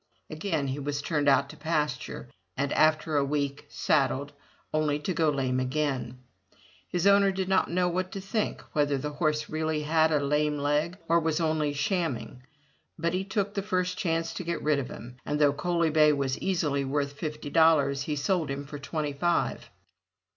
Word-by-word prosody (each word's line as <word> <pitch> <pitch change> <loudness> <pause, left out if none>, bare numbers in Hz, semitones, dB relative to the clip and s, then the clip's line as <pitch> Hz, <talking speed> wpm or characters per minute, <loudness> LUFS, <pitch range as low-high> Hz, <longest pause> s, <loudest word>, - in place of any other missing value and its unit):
Again 155 -3 -2
he 135 +2 -3
was 145 0 -2
turned 145 -1 +1
out 140 0 +4
to - - -10
pasture, 150 -5 -2 0.3
and 140 +1 0
after 155 0 +3
a 140 - +3
week, 140 0 -2
saddled, 140 -1 +1 0.4
only 155 -1 +1
to 150 +5 -3
go 160 -2 +2
lame 130 -3 0
again. 130 -1 -1 0.7
His 175 0 -1
owner 200 0 +6
did 190 -1 -2
not 190 0 +2
know 180 +1 +1
what 185 +1 -2
to 195 - -4
think, 200 +3 -2
whether 145 -2 +2
the 150 +2 -4
horse 150 0 0
really 155 -1 -1
had 160 +1 +3
a 150 - +3
lame 150 +1 +1
leg 150 +5 0
or 170 +1 +4
was 160 -1 0
only 155 -2 +1
shamming, 145 - -2 0.6
but 170 +1 -1
he 185 +1 0
took 200 0 -2
the 200 - -1
first 185 -2 -1
chance 165 -3 -1
to - - -5
get 170 0 -3
rid 150 -1 +2
of 130 - -4
him, 125 +2 -10
and 150 - -1
though 145 -1 +4
Coaly 170 +1 0
bay 150 -1 +5
was 135 -2 0
easily 150 -7 0
worth 140 +1 -1
fifty 150 0 -5
dollars, 145 -4 +4
he 150 +2 -2
sold 160 +2 0
him 140 +1 -4
for 145 +1 -8
twenty 150 0 -3
five. 170 +4 0
150 Hz, 185 wpm, -28 LUFS, 140-170 Hz, 0.7 s, owner